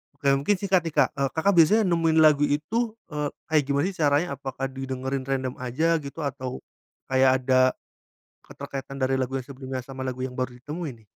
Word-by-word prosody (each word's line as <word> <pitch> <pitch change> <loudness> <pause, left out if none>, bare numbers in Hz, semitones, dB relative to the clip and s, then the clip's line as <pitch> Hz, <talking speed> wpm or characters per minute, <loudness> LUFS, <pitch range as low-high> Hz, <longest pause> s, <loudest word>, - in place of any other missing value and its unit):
Oke, 140 -1 -4
mungkin 205 +9 +2
singkat 190 -1 +2
nih 160 - -5
Kak, - - +4
eee, 135 -1 +1
Kakak 195 +5 +2
biasanya 210 +7 +6
nemuin 165 -1 +2
lagu 145 -1 +5
itu, 220 +10 -1 0.2
eee, 150 -1 -2 0.2
kayak 155 -2 +3
gimana 140 +1 +1
sih - - -15
caranya? 145 +4 +3
Apakah 135 0 -5
didengerin 130 0 -4
random 130 -2 -1
aja 155 +7 +1
gitu 140 +2 -9
atau 130 -2 -4 0.5
kayak 130 0 +5
ada 130 0 +4 0.7
keterkaitan 135 0 -7
dari 130 0 +2
lagu 130 +1 -2
yang 130 - -4
sebelumnya 130 -1 -6
sama 135 0 -9
lagu 130 0 -4
yang 130 - -4
baru 125 -1 -2
ditemui 150 +4 -5
nih? - - -34
140 Hz, 190 wpm, -25 LUFS, 130-160 Hz, 0.7 s, biasanya